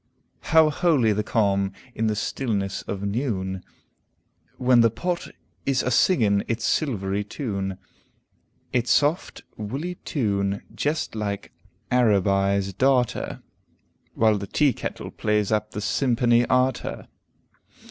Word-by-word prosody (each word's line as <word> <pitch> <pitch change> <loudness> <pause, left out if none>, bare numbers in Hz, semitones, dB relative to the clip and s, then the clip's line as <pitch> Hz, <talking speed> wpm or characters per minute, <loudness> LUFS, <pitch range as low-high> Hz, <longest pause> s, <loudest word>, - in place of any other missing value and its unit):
"How 160 -1 +4
holy 145 - +3
the 105 - 0
calm, 100 -3 +1 0.2
in 110 -1 -1
the 110 - 0
stillness 100 -4 -2
of 100 0 -5
neune, 100 -4 -2 1.0
When 125 -1 +4
the 115 - +5
pot 170 +11 -3 0.4
is 135 -2 +1
a 125 - -1
singin 110 - +3
its 115 -1 -2
silvery 105 - 0
teune, 100 -5 -4 1.0
Its 120 -1 +1
soft, 150 +5 +1
woolly 140 +12 -4
teune, 100 -6 -1
jest 150 +2 -1
like 105 -2 -4 0.4
Aribi's 100 -4 +2
Darter, 130 +2 +1 0.7
While 110 -2 +3
the 100 - -6
tea 145 +5 +2
kettle - - -6
plays 105 -1 0
up 105 0 0
the 105 - -5
simperny 120 0 +2
arter. 130 0 0
110 Hz, 115 wpm, -24 LUFS, 100-130 Hz, 1.0 s, the